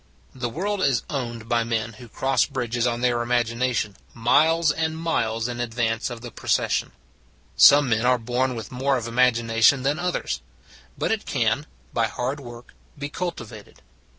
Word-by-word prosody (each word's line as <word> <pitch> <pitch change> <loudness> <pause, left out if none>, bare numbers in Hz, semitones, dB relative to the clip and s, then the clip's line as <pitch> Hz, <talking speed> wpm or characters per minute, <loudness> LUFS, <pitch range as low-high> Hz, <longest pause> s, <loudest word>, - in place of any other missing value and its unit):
The 120 -2 -3
world 195 - -2
is 130 -7 +2
owned 120 -5 -4
by 115 0 +2
men 115 0 -2
who 120 - -11
cross 130 +2 +1
bridges 120 -3 -1
on 120 0 -2
their 120 -1 +2
imaginations 120 -2 0 0.2
miles 155 +7 +3
and 160 0 -2
miles 115 -9 -1
in 120 0 -5
advance 115 -1 -1
of 120 -2 -7
the 120 -1 -8
procession. - - 0 0.6
Some 145 0 +7
men 110 0 +1
are 125 0 +4
born 125 +2 -1
with 110 -3 -7
more 135 +2 +1
of 120 - -4
imag 125 +2 +3
ination 115 +3 +3
than 145 +4 0
others; 180 0 -2 0.6
but - - -1
it - - -2
can, - - 0 0.3
by - - +2
hard 130 +4 -3
work, 120 -2 -11 0.2
be 145 0 -5
cultivated. 120 - -7
120 Hz, 165 wpm, -24 LUFS, 115-140 Hz, 0.6 s, Some